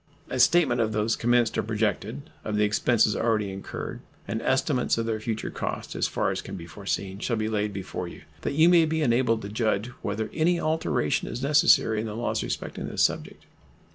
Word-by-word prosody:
A 130 - -2
statement 125 -3 +4
of 110 -1 0
those 105 +1 +1
commenced 120 -1 +2
or - - +3
projected, 110 +6 -2
of 105 - -3
the 105 - +3
expenses 105 +1 +3
already 110 -3 0
incurred, 95 0 -6 0.3
and 110 - -2
estimates 130 -2 +1
of 115 - -1
their 110 -1 -1
future 110 0 -3
cost, - - -4
as - - +1
far - - 0
as - - -3
can - - -8
be 85 - -7
foreseen, 95 +1 -4
shall 115 +2 -1
be 110 0 -1
laid 105 -1 -1
before 95 -2 -5
you, - - -11 0.2
that - - -2
you 160 +2 +6
may 175 -2 +6
be 160 0 0
enabled 120 -3 +2
to 100 - -5
judge 110 0 0
whether 110 +1 -3
any 170 +2 +2
alteration 155 - 0
is 125 - -5
necessary 135 -6 +4
in 110 - -3
the 105 - -5
laws 120 +1 -1
respecting - - -4
this - - +1
subject. - - -1
115 Hz, 200 wpm, -26 LUFS, 105-130 Hz, 0.3 s, you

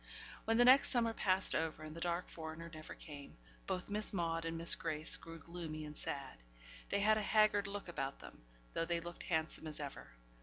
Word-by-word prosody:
When 225 0 +2
the 245 - +6
next 260 +2 +8
summer 230 -3 +2
passed 190 -3 +3
over, 155 -1 -1
and 155 0 -8
the - - -6
dark 175 +1 -1
foreigner 160 +1 -7
never 155 0 -8
came, 145 -2 -10 0.3
both 180 - -2
Miss 210 +1 +4
Maude 165 -3 -1
and 165 0 -2
Miss 165 +1 +5
Grace 155 -1 +2
grew 165 0 -7
gloomy 160 -2 -6
and 150 0 -8
sad; - - -5 0.5
they 200 - +1
had 215 +1 +4
a - - -1
haggard 210 -1 +3
look 200 -1 -5
about 135 -5 -3
them, - - -13 0.3
though 165 - 0
they 170 0 0
looked 170 +1 -8
handsome 160 -1 -1
as 150 -1 -4
ever. 140 -2 -6
170 Hz, 200 wpm, -37 LUFS, 155-200 Hz, 0.5 s, next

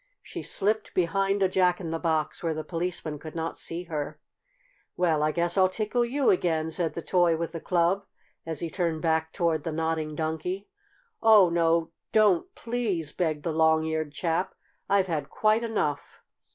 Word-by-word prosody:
She - - -7
slipped 215 +2 0
behind 195 +3 +1
a - - +5
Jack 180 -1 +2
in 170 -4 -5
the 165 - -2
Box, 160 -3 -1
where 165 -2 -1
the 155 - -4
Policeman 165 -3 -3
could 155 +2 -9
not 165 0 -4
see 170 +2 -4
her. 155 -4 -5 0.8
"Well, 165 -4 +2
I 155 0 +2
guess 175 +3 0
I'll 185 0 +5
tickle 215 +5 0
you 265 +3 +2
again," 160 -3 0
said 165 -1 -1
the 170 - -5
toy 175 -3 +3
with 165 0 -3
the 165 - -5
club, 180 +4 +1 0.4
as 160 -2 -4
he 165 - -3
turned 165 -3 -1
back 160 -1 +1
toward 165 -4 0
the 165 - -3
Nodding 160 -1 -2
Donkey. 160 +5 -3 0.5
"Oh, 215 -5 +7
no, 165 -1 +2 0.2
don't, 210 -6 +4
please!" 220 -10 -2
begged 155 -4 -1
the 165 - -1
long 160 0 +3
eared 160 -1 -2
chap. 165 +4 -1 0.3
"I've 200 -1 +3
had 155 -5 -3
quite 215 +2 +2
enough. 205 -11 -2
170 Hz, 180 wpm, -27 LUFS, 160-190 Hz, 0.8 s, Oh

